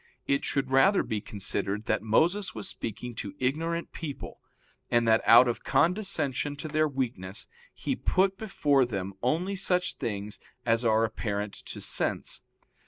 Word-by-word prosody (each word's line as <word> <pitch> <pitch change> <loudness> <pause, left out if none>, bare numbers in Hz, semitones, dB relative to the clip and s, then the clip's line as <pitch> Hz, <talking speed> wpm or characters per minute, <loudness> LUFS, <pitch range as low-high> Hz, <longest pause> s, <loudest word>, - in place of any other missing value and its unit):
It 140 0 +1
should 135 -2 -1
rather 190 +10 +5
be 110 -2 -3
considered 100 +1 -2
that 110 - +1
Moses 170 - +2
was 110 - -4
speaking 120 +3 -5
to 100 - -5
ignorant 165 +6 -1
people, 150 -4 -7 0.5
and 120 -1 +3
that 110 0 +5
out 120 +2 +8
of 120 - -2
condescension 155 -3 +1
to 145 - -6
their 155 0 +2
weakness 115 -8 -3 0.3
he - - -3
put 195 +1 +2
before 150 -10 +2
them 100 -5 -3
only 170 +10 0
such 180 -1 0
things 105 -3 -4 0.3
as 115 0 +2
are 110 -1 +3
apparent 105 -2 -3
to - - -8
sense. - - -1
130 Hz, 150 wpm, -28 LUFS, 110-160 Hz, 0.5 s, out